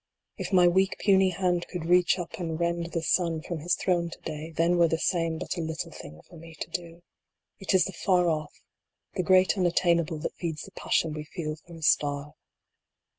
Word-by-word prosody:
VI. - - -2
If - - -11
my 180 -1 +6
weak 190 +2 +2
puny 190 -2 +4
hand 180 -1 0
could 175 -3 -5
reach 180 +1 +4
up 175 0 -6
and 165 -2 -3
rend 170 0 0
the 165 - -2
sun 170 0 +2
DYING. 160 -1 -5
113 - - -12
from 170 -3 -3
his 175 +4 +1
throne 175 -2 0
to - - -9
day, 155 0 -6
then 170 +2 +1
were 170 - +6
the 165 - 0
same 165 -1 0
but 175 - -4
a - - -1
little 160 0 -4
thing 75 - -11
for 175 - -14
me 165 0 -12
to - - -5
do. 170 -1 -6 0.6
It 195 0 0
is 185 - +5
the 190 - -5
Far 180 +1 +2
Off, 155 -2 -3 0.5
the - - -1
great 185 +1 +4
Unattainable, 170 -2 +2
that - - -3
feeds 160 -3 -4
the - - -11
passion 160 -2 0
we 150 0 -6
feel 155 -1 -5
for 165 +2 -15
a 165 - -10
star. 145 -1 +1
170 Hz, 225 wpm, -27 LUFS, 160-180 Hz, 0.6 s, my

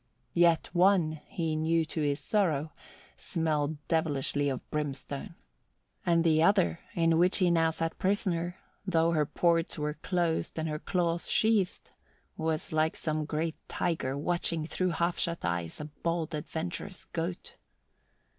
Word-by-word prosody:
Yet 170 -2 +4
one, 175 -4 +3
he 165 -2 -2
knew 160 +1 +2
to 160 +1 -4
his 145 0 +1
sorrow, 160 -8 0 0.4
smelled 155 -2 -1
devilishly 145 -3 +1
of 130 -2 -4
brimstone; 140 -2 -4 0.7
and 170 -1 +3
the 160 -2 +4
other, 185 -1 +3 0.2
in 165 -1 +3
which 180 +2 +4
he 180 -3 +3
now 165 -1 +4
sat 165 0 -2
a - - -26
prisoner, 180 -3 0 0.3
though 170 -3 +2
her 155 -3 +2
ports 170 0 +1
were 150 0 -1
closed 165 +1 -1
and 160 0 -1
her 150 -1 -3
claws 170 -2 -1
sheathed, 215 -4 +2 0.4
was 160 -1 -2
like 155 0 +1
some 155 -1 -2
great 160 +2 -2
tiger 140 -6 -1
watching 170 0 0
through 185 +3 -1
half 170 +1 0
shut 170 0 -1
eyes 85 -1 -2
a 150 - -4
bold, 165 +2 -3
adventurous 170 +5 -4
goat. 170 +2 -5
165 Hz, 145 wpm, -30 LUFS, 155-175 Hz, 0.7 s, Yet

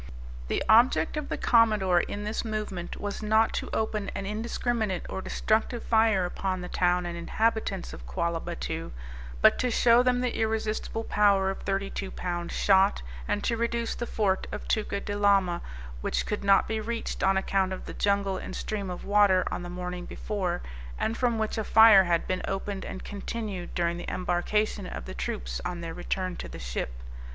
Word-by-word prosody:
The - - 0
object 235 +8 +5
of 300 -1 -4
the - - -2
Commodore, 215 -6 +4
in 205 +3 -3
this 210 +1 -2
movement, 210 -6 -4
was 205 +1 -4
not 220 +1 +3
to - - -3
open 215 -2 -1
an 195 - -3
indiscriminate 220 -1 -2
or 190 - -4
destructive 225 +4 0
fire 220 -5 +3
upon 185 +1 -2
the 180 - -5
town 180 0 +1
and 175 0 -4
inhabitants 210 +2 -1
of - - -10
Quallah 170 -2 -1
Battoo, 60 0 -5 0.5
but - - +6
to 250 - +1
show 235 +1 +5
them 250 0 +2
the 250 -1 -1
irresistible 220 0 -1
power 200 -3 +3
of 195 - -7
thirty 195 0 -2
two 195 - -4
pound 175 -2 -4
shot, 195 - +3 0.2
and - - -1
to 235 - +1
reduce 235 0 -1
the 240 - -4
fort 195 -3 0
of - - -6
Tuca 205 -2 -1
de 205 - -3
Lama, 195 -4 +3 0.4
which - - -1
could 210 -1 -3
not 195 -1 +5
be 220 0 -1
reached 230 +1 -4
on 190 0 +3
account 190 0 +1
of 190 - -5
the - - -7
jungle 200 -1 +1
and - - -7
stream 200 -3 -3
of 180 - -6
water, 200 -2 +4
on - - -3
the 175 - -6
morning 180 0 -5
before, 185 -5 -3 0.3
and 225 - -1
from 240 -2 +1
which 220 +1 -1
a - - 0
fire 220 -3 +8
had 170 -1 +1
been 185 0 -1
opened 195 0 -3
and 190 - -7
continued 205 -2 -5
during 170 0 0
the - - -5
embarkation 185 +3 0
of - - -6
the - - -7
troops 60 -1 -4
on 175 -1 -4
their 165 -1 -5
return 185 0 -3
to - - -6
the - - -8
ship. - - -4
200 Hz, 190 wpm, -28 LUFS, 180-220 Hz, 0.5 s, fire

